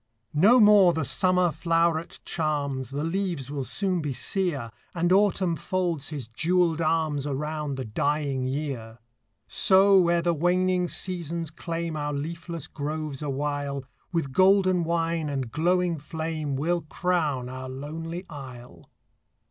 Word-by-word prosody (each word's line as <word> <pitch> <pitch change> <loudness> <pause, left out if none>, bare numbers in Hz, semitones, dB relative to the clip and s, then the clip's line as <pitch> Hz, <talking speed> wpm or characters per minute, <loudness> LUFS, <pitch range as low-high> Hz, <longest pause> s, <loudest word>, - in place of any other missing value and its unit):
No 205 +12 +6
more 205 -5 +7
the 160 -3 -1
summer 180 +5 +3
floweret 165 +1 0
charms, 140 -5 -2
The 145 +2 -3
leaves 165 -6 -2
will 140 -2 -3
soon 185 +4 0
be 145 -3 -2
sere, 145 - -2 0.2
And 175 +1 +1
Autumn 190 -3 +3
folds 170 -4 -2
his 145 -7 -6
jewelled 165 +6 +1
arms 155 -3 0
Around 150 0 -3
the 130 -1 -4
dying 140 +3 -1
year; 130 -5 -4 0.5
So, 190 -1 +5
ere 170 0 +2
the 170 0 +2
waning 180 +2 +1
seasons 170 -3 -3
claim 165 0 -4
Our 145 -1 -2
leafless 165 +2 -5
groves 150 -1 -4
awhile, 145 -1 -3 0.3
With 160 -6 -2
golden 185 -1 +4
wine 165 -1 -1
and 135 -4 -3
glowing 175 +1 +1
flame 155 -1 -4
We 150 +6 -1
'll 175 -1 +1
crown 155 -8 0
our 130 0 -7
lonely 165 +6 -6
isle. 130 -5 -11
160 Hz, 135 wpm, -26 LUFS, 140-175 Hz, 0.5 s, more